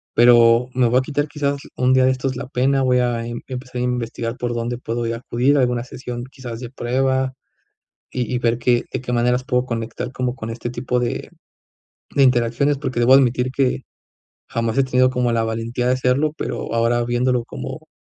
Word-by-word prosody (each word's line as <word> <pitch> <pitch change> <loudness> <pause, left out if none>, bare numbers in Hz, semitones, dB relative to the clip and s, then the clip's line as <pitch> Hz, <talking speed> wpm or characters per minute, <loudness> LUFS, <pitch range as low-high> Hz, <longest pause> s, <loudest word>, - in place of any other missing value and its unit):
pero 120 0 +6
me 125 -2 +3
voy 125 +2 +3
a - - +4
quitar, 145 +2 -1
quizás, 145 -1 -1 0.2
un 130 +1 +2
día 130 0 +5
de 130 - +4
estos 130 0 -2
la 130 0 -5
pena, 135 +1 +1
voy 125 -1 +3
a 120 -2 0
em 120 0 -5
empezar 125 -1 -5
a - - 0
investigar 120 -1 -2
por 120 -1 -2
dónde 120 +1 -3
puedo 120 -1 -3
yo 115 - -1
acudir 125 +4 +1
a - - +4
alguna 125 -1 +1
sesión, 125 -1 -7
quizás, 120 -4 -7
de 125 -1 -7
prueba, 130 +1 0 0.8
y 125 0 -2
y - - +1
ver 120 -1 +1
que 120 -1 +2
de - - -2
qué 125 -1 -5
maneras 125 +1 +1
puedo 125 -3 +1
conectar 115 +1 -4
como 125 -1 -2
con 115 -4 -6
este 120 +1 -5
tipo 125 0 -1
de 120 - -3 0.8
de 140 - +4
interacciones, 125 +3 +2
porque 130 -4 -2
debo 120 +2 +6
admitir 125 -1 +3
que, 130 -1 0 0.7
jamás 115 +1 -1
he 135 - +4
tenido 130 0 +3
como 125 -2 0
la 115 -1 +1
valentía 115 +2 -2
de 125 - +3
hacerlo, 130 +4 +1
pero - - -4
ahora 120 +1 +2
viéndolo 120 0 +1
como - - -8
125 Hz, 205 wpm, -21 LUFS, 120-130 Hz, 0.8 s, pero